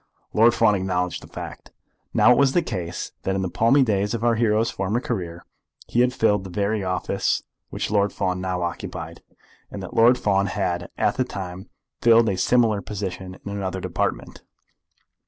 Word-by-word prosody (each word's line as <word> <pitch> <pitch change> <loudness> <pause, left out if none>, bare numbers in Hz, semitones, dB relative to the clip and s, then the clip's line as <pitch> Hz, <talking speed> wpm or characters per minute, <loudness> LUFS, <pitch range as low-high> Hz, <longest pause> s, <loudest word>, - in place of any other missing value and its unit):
Lord 115 +2 +5
Fawn 105 - +4
acknowledged 90 -2 -1
the - - -12
fact. - - -9 0.4
Now - - +5
it 125 - +5
was 135 -1 +4
the 175 - +3
case 90 -6 -4
that 95 - -1
in 95 - -1
the 90 - -3
palmy 115 +9 +4
days 105 -1 0
of 115 - -4
our 120 -1 +4
hero's 115 0 +2
former 95 +5 -1
career 90 -9 -4 0.4
he 120 - +2
had 125 0 +3
filled 105 -5 +2
the 95 - -8
very 100 +3 -1
office 90 -1 -1 0.3
which - - -3
Lord 100 -1 +2
Fawn 90 -2 -2
now 90 -1 -2
occupied, 85 - -5 0.5
and 100 - -7
that 95 - -8
Lord 120 +2 +5
Fawn 100 -1 +1
had 95 -3 -2
at - - +1
the 130 - +2
time 95 -4 -7 0.3
filled 115 -1 +5
a 95 - 0
similar 110 +1 +2
position 95 -3 -6
in 100 - -5
another 95 -2 -3
department. - - -3
100 Hz, 180 wpm, -23 LUFS, 95-115 Hz, 0.5 s, Lord